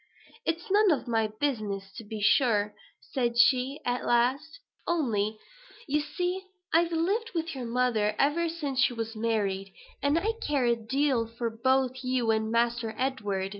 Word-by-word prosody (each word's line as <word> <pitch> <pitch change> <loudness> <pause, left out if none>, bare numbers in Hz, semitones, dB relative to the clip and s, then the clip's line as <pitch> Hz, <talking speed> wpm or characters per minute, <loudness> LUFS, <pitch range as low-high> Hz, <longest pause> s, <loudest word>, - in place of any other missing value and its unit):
"It's 335 +3 -2
none 415 0 +5
of 295 -6 +1
my 225 -2 +1
business, 215 -5 -3
to 230 - -7
be 215 0 -6
sure," 210 -2 +3 0.4
said 240 -2 0
she 255 +4 +4
at 245 0 -1
last: 265 - +1 0.3
"only, 220 -10 0 0.5
you 295 +2 +2
see, 360 +4 -2 0.3
I've 335 +1 +4
lived 395 +8 0
with 330 0 -2
your 260 -3 -5
mother 230 -3 +1
ever 325 +4 +2
since 290 -5 -3
she 265 -2 +4
was 225 -1 -4
married; 205 -4 -1 0.3
and 285 +3 +2
I 420 +6 +1
care 280 -4 +1
a 235 0 +3
deal 245 +1 0
for 230 0 -4
both 260 +2 +1
you 255 -3 +1
and 220 0 0
Master 235 -1 0
Edward. 205 -8 -1
250 Hz, 160 wpm, -28 LUFS, 225-295 Hz, 0.5 s, none